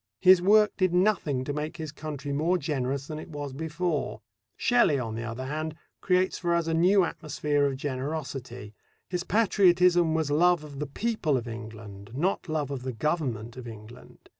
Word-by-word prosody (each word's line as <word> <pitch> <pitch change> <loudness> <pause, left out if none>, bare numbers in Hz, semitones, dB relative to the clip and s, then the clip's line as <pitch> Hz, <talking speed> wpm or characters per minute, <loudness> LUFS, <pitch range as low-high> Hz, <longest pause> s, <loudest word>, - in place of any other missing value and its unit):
His 185 - +7
work 210 +2 +5
did 185 -2 +2
nothing 180 -9 +2
to 145 - -3
make 150 +2 -4
his 155 -3 -5
country 150 -2 -5
more 165 +6 +2
generous 135 -3 -2
than 155 +1 -6
it 155 - -9
was 145 -3 -6
before. 160 +2 -2 0.4
Shelley, 240 - +3
on 115 -4 -3
the 115 - -4
other 120 +2 -5
hand, 155 +3 -3 0.3
creates 185 0 +1
for 170 -1 +1
us 170 -1 +1
a 165 - -1
new 185 +4 +4
atmosphere 150 -3 0
of 135 -1 -3
generosity. 130 -5 -5 0.4
His 180 -1 -1
patriotism 180 -5 +4
was 160 -3 0
love 175 +2 +4
of 145 -2 -9
the 150 - -2
people 170 - 0
of 120 -1 -5
England, 110 -3 -9
not 175 +4 -1
love 150 -3 -1
of 135 -3 -4
the 130 0 -4
Government 120 -4 -2
of 125 -2 -8
England. 110 +1 -12
150 Hz, 180 wpm, -27 LUFS, 130-175 Hz, 0.4 s, His